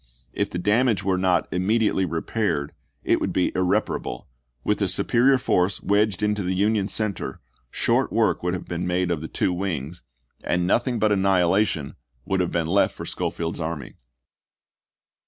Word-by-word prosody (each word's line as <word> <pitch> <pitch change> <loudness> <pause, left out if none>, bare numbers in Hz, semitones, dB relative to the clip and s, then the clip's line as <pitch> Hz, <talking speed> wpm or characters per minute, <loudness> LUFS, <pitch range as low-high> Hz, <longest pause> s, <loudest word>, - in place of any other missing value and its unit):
If - - -1
the - - -4
damage 105 +2 +2
were 95 -1 +1
not 90 -1 +2
immediately 100 +1 +1
repaired, 85 -3 -2 0.3
it - - +2
would - - -1
be 90 - +1
irreparable; 90 -1 -1 0.4
with - - 0
a - - +2
superior 130 +3 +3
force 95 -6 0
wedged 105 -1 +1
into 105 0 +1
the 95 0 -1
Union 100 +1 +1
cen 105 -1 -1
ter, - - -6 0.3
short - - +1
work - - +2
would 90 +1 -1
have 90 - -6
been 85 +1 -3
made 90 0 0
of 80 -3 -1
the 80 - -5
two 90 - 0
wings, 85 -4 -4 0.4
and 90 0 0
nothing 120 +6 +1
but 110 -1 +2
annihilation 95 -5 +2 0.3
would 95 0 0
have 90 -1 0
been 85 0 0
left 95 +5 +2
for - - -7
Schofield's 85 0 -3
army. 80 -5 -4
95 Hz, 165 wpm, -24 LUFS, 85-105 Hz, 0.4 s, superior